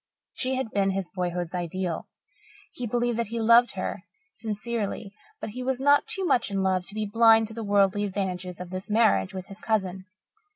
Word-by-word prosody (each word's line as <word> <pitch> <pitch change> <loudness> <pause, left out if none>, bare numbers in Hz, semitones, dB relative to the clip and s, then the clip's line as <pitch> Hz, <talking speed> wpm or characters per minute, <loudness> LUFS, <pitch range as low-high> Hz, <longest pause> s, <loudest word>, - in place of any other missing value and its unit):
She 260 0 -1
had 260 -4 -2
been 195 -1 +2
his 190 -1 -2
boyhood's 180 -2 -2
ideal. 175 -1 -3 0.6
He 245 - -5
believed 240 +1 0
that 230 - 0
he 230 +2 -4
loved 235 +2 +5
her - - -4 0.3
sincerely, 215 -2 -4 0.3
but - - -5
he 250 +4 -6
was 260 0 -1
not 285 +1 +4
too 385 - -2
much 250 - +2
in 195 -1 -1
love 185 -1 +1
to 205 - -4
be 215 0 -1
blind 225 +1 +5
to - - -9
the 230 - -5
worldly 200 0 +3
advantages 185 -3 -3
of 180 0 -7
his 185 +2 -6
marriage 215 -3 +3
with 185 -1 -5
his 195 +1 -11
cousin. 190 -4 -1
205 Hz, 195 wpm, -26 LUFS, 190-230 Hz, 0.6 s, loved